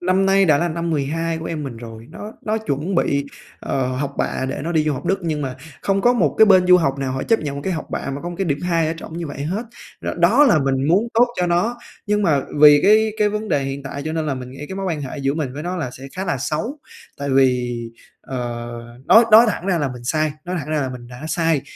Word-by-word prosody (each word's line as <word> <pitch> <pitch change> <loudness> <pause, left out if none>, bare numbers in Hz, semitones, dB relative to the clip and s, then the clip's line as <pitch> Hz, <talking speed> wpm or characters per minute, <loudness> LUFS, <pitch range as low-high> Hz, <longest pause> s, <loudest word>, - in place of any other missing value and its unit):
năm 185 +2 +2
nay 195 0 +4
đã 155 -5 +4
là 175 +2 0
năm 170 +1 -3
12 160 +3 -1
của 160 - -7
em 155 -3 -4
mình 130 -4 -6
rồi, 115 -1 -10
nó 210 +6 -8
nó 220 +1 -1
chuẩn 180 -3 -3
bị, 140 -5 +1 0.4
ờ, 130 -2 -1
học 140 0 -3
bạ 130 - -1
để 130 - -4
nó 170 - -2
đi 155 -2 +2
du 155 - +1
học 130 - -6
Đức 195 +2 +1
nhưng 155 -3 -2
mà 130 -2 -4 0.3
không 195 0 +1
có 245 +4 +4
một 245 - +1
cái 220 - +8
bên 185 -2 +5
du 180 0 +8
học 140 -6 0
nào 135 -1 -2
họ 130 - -3
chấp 225 -1 +2
nhận 145 -2 -4
một 140 - -5
cái 190 - -1
học 160 - -4
bạ - - -3
mà 140 +1 -5
có 175 - -4
một 175 - -6
cái 195 - 0
điểm 145 -5 -1
2 170 -2 +1
ở 160 - -2
trỏng 165 +1 -8
như 170 - -4
vậy 140 -1 -6
hết. 190 +9 -2 0.4
Rồi - - -3
đó 220 +12 +5
là 175 - +5
mình 135 -1 0
muốn 200 +8 +3
tốt 240 +2 +5
cho 180 - +1
nó, 175 +8 +1 0.3
nhưng 210 0 +1
mà 150 -8 +2 0.2
vì 150 -1 +8
cái 215 +1 +4
cái 210 - +3
vấn 210 +1 -4
đề 140 - +1
hiện 135 +1 -4
tại 140 +1 -6
cho 155 - -3
nên 160 -1 -2
là 140 - -1
mình 125 -1 -7
nghĩ 135 +3 -8
cái 190 - -6
mối 195 0 -3
quan 165 -5 -2
hệ 140 +2 -6
giữa 135 +1 0
mình 145 -5 -3
với 150 - -5
nó 180 +1 -3
là 145 -8 -3
sẽ 130 - -11
khá 190 - -2
là 175 -6 -1
xấu. 220 - -3 0.4
Tại 140 -1 -3
vì, 125 -2 +2 0.4
ờ, 130 - -7 0.7
nói 230 +1 +7
nói 225 +2 +8
thẳng 185 - -5
ra 185 -3 +1
là 145 -3 0
mình 125 -1 -10
sai, 155 +3 0
nói 180 +1 -3
thẳng 150 - -8
ra 155 -1 0
là 135 - -1
mình 125 -2 -8
đã 125 +5 -10
sai 165 -3 +1
160 Hz, 285 wpm, -20 LUFS, 140-185 Hz, 0.7 s, cái